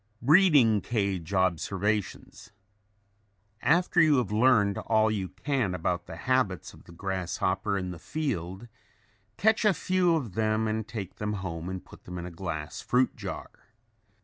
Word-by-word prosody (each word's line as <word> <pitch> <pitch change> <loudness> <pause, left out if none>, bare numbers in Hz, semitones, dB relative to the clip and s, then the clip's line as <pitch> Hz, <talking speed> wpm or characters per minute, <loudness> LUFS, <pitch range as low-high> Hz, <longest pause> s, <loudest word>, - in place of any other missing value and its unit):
BREEDING 140 - +5
CAGE 100 -6 -2
OBSERVATIONS 95 +2 -1 1.1
After 175 +2 +3
you 155 -3 +5
have 125 -4 0
learned 105 -3 +3
all 110 -1 +2
you 95 -4 -2
can 105 -1 -1
about 85 0 -2
the - - -7
habits 130 -8 0
of - - -17
the - - -14
grasshopper 95 +2 -2
in 90 -1 -3
the 85 - -8
field, 100 - -4 0.7
catch 220 +2 +3
a 210 -4 +4
few 180 -1 +2
of 125 - -3
them 110 +1 +1
and 110 0 -2
take 105 -6 -6
them 105 0 -2
home 90 -3 -5
and 95 -2 -6
put - - -16
them 90 0 -7
in 85 - -5
a 90 - -7
glass 80 -3 -5
fruit 125 +1 +1
jar. - - -6
105 Hz, 150 wpm, -28 LUFS, 95-125 Hz, 1.1 s, BREEDING